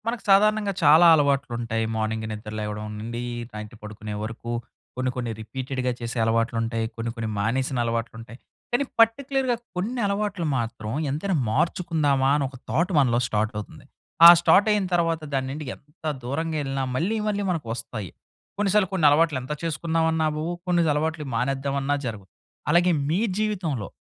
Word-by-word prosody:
మనకు 235 0 -2
సాధారణంగా 210 +1 +4
చాలా 160 +4 +7
అలవాట్లు 140 -3 +1
ఉంటాయి. 115 -1 -1
మార్నింగ్ 110 0 -2
నిద్ర 105 0 -7
లేవడం 105 0 -4
నుండి, 115 +2 -5 0.3
నైట్ 105 +1 -8
పడుకునే 105 0 -7
వరకు, 115 +2 -6 0.4
కొన్ని, 130 0 -1
కొన్ని 120 -2 -3
రిపీటెడ్‌గా 130 +2 -3
చేసే 120 0 -5
అలవాట్లు 115 +1 +1
ఉంటాయి, 115 0 -1
కొన్ని, 115 0 -3
కొన్ని 115 -2 -3
మానేసిన 130 +5 0
అలవాట్లు 115 -1 -2
ఉంటాయి. 120 +1 -11 0.4
కానీ 245 - +3 0.2
పర్టిక్యులర్‌గా 260 +2 +3 0.2
కొన్ని 220 +8 -2
అలవాట్లు 200 -3 -1
మాత్రం 115 -2 -4 0.2
ఎంతైనా 165 +7 -1 0.2
మార్చుకుందామా, 145 -2 +1
అని 140 - 0
ఒక 130 - -12
థాట్ 175 +4 +1
మనలో 120 -4 +3
స్టార్ట్ 110 +1 -1
అవుతుంది. 105 -6 -8 0.4
ఆ - - +14
స్టార్ట్ 200 +4 +5
అయిన 210 -2 +2
తరువాత 165 -2 +1
దాన్ని 130 -1 -1
నుండి 150 +2 -6
ఎంత 150 +2 -29 0.2
దూరంగా 155 +5 -2
ఎళ్ళినా, 135 0 -2
మళ్ళీ, 180 +11 0
మళ్ళీ 205 -1 0
మనకు 160 -9 -3
వస్తాయి. 110 -6 -6 0.5
కొన్నిసార్లు 205 -1 +2
కొన్ని 175 -5 +1
అలవాట్లు 155 0 +3
ఎంత 130 +4 -4
చేసుకుందాం 165 0 0
అన్నా 160 -1 +1
అవవు, 155 +3 -3 0.2
కొన్ని 175 -1 +3
అలవాట్లు 155 +1 -1
మానేద్దామన్నా 135 +3 0
జరగవు. 105 -5 -5 0.4
అలాగే 175 +1 +4 0.2
మీ 170 +5 +1 0.2
జీవితంలో 180 - -1
140 Hz, 155 wpm, -25 LUFS, 115-170 Hz, 0.5 s, ఆ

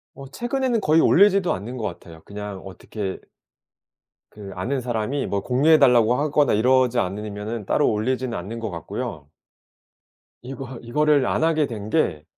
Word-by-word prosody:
어 135 - -10
최근에는 240 - -1
거의 160 -2 +4
올리지도 195 -1 +4
않는 110 +7 -6
것 115 - -5
같아요. 85 -4 -7
그냥 105 -1 -7
어떻게 95 0 -6 1.1
그 100 -2 -10
아는 125 +10 -2
사람이 120 +2 -2
뭐 100 -1 -2
"공유해 145 +7 +3
달라."고 125 -4 +5
하거나 145 +1 +2
이러지 125 +2 +3
않으면은 105 +2 -4
따로 145 - +2
올리지는 120 +2 -2
않는 105 +7 -6
것 110 -1 -4
같고요. 80 -4 -6 1.1
이거 130 0 -8
이거를 145 +3 +2
안 - - 0
하게 160 -2 +2
된 110 -3 -7
게 85 - 0
120 Hz, 325 characters per minute, -23 LUFS, 105-145 Hz, 1.1 s, 달라."고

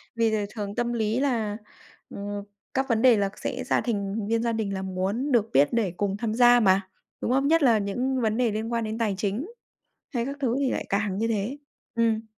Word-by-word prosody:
Vì 230 -1 +2
là 210 -2 0
thường 205 -2 -4
tâm 240 0 -1
lý 220 +1 0
là, 230 -7 0 0.5
ừm, 205 0 -5 0.3
các 265 +1 0
vấn 225 -1 +2
đề 250 -4 +6
là 200 -1 +1
sẽ 255 +4 -4
ra 250 - +1
thành 205 -2 -2
viên 230 +1 +1
gia 235 - +1
đình 215 -3 -2
là 190 - -3
muốn 190 +9 -2
được 225 -3 +3
biết 140 +2 +5
để 210 -7 +1
cùng 200 -1 -1
tham 220 -1 -2
gia 245 +1 +6
mà, 195 -2 +4 0.4
đúng 245 - -1
không? 270 +2 +2
Nhất 325 +1 +4
là 235 -5 +5
những 250 +6 -1
vấn 220 0 +1
đề 240 -3 +2
liên 220 +2 -3
quan 230 - 0
đến 220 0 -3
tài 215 -4 0
chính 210 - -2 0.7
hay 235 -1 0
các 280 - -4
thứ 250 -2 +1
thì 275 -2 +1
lại - - -3
càng 200 -1 0
như 225 +1 0
thế. 225 +6 -2 0.4
Ừm. 225 -1 +1
225 Hz, 230 wpm, -26 LUFS, 205-240 Hz, 0.7 s, đề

